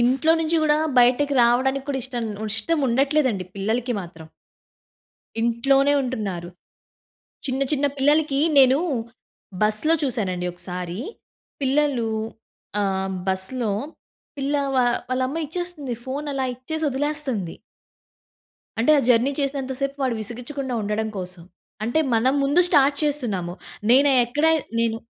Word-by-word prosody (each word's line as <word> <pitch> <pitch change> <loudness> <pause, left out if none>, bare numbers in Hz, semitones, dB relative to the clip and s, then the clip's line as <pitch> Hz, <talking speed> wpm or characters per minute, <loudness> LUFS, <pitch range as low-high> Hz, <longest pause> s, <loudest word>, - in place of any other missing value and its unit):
ఇంట్లో 260 +7 +3
నుంచి 325 +1 +1
గూడా 300 -1 +3 0.2
బయటకి 255 +4 +4
రావడానికి 265 +3 +2
కూడా 275 -2 -1
ఇష్టం 245 -3 -3 0.3
ఇష్టం 305 +9 +1
ఉండట్లేదండి 265 -5 +1
పిల్లలకి 225 +5 -1
మాత్రం. 165 -3 -11 1.1
ఇంట్లోనే 270 +5 +3
ఉంటున్నారు. 200 -9 -4 1.0
చిన్న, 265 0 -1
చిన్న 285 0 +2
పిల్లలకి 290 0 +2 0.2
నేను 265 +1 +6 0.8
బస్‌లో 215 +10 +3
చూశానండి 195 -10 -1
ఒకసారి, 180 +1 -6 0.6
పిల్లలు 270 -3 +1 0.7
ఆహ్, 190 -1 -1 0.2
బస్‌లో 205 +5 -1 0.7
పిల్ల 280 +1 0 0.2
వా 255 - +4 0.3
వాళ్ళ 255 0 0
అమ్మ 310 - -4
ఇచ్చేస్తుంది. 320 -5 -4
ఫోన్ 280 +3 -4
అలా 270 -1 -1
ఇచ్చేసి 315 +6 -4
వదిలేస్తంది. 270 - -2 1.2
అంటే 240 +7 +3
ఆ - - +4
జర్నీ 245 +3 +4
చేసినంత‌సేపు 275 0 -2
వాడు 255 -3 +1
విసిగించకుండా 250 +4 -4
ఉండడం 210 +1 -1
కోసం. 180 -2 -7 0.4
అంటే 240 +7 0 0.2
మనం 240 +4 +3
ముందు 290 +6 +3
స్టార్ట్ 285 -3 +4
చేస్తున్నాము. 220 -12 -1 0.4
నేను 275 +3 +6
ఎక్కడ 295 +6 0 0.3
నేను 230 -1 +1
260 Hz, 115 wpm, -23 LUFS, 220-285 Hz, 1.2 s, నేను